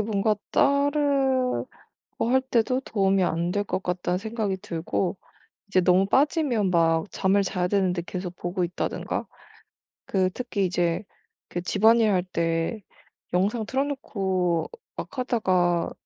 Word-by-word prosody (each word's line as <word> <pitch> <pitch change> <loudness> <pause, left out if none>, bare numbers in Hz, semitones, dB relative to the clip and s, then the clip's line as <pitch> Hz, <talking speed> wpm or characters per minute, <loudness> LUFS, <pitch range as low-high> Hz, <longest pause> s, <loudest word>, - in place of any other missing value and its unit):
뭔가 210 0 +1
따르고 280 -2 +2 0.6
할 260 +1 +4
때도 255 0 +1
'도움이 195 -5 +1
안 170 +1 0
될 205 +1 0
것 195 -1 -3
같다.'는 180 0 -1
생각이 215 -2 -2
들고 185 0 -2 0.5
이제 185 -2 +3
너무 180 +2 +4
빠지면 270 - +2
막 165 -1 +3
잠을 195 +1 +2
자야 180 -1 -1
되는데 185 -3 +1
계속 180 -1 -5
보고 175 +1 -2
있다든가. 175 0 -3 0.8
그 185 -2 +1
특히 215 -5 -2
이제 175 +1 0 0.5
그 175 - -3
집안일 220 +4 +4
할 180 -2 +2
때 170 +3 -1 0.5
영상 205 +5 +1
틀어놓고 195 - -1 0.3
막 275 - -7
하다가 185 -9 +1
195 Hz, 245 characters per minute, -25 LUFS, 180-235 Hz, 0.8 s, 할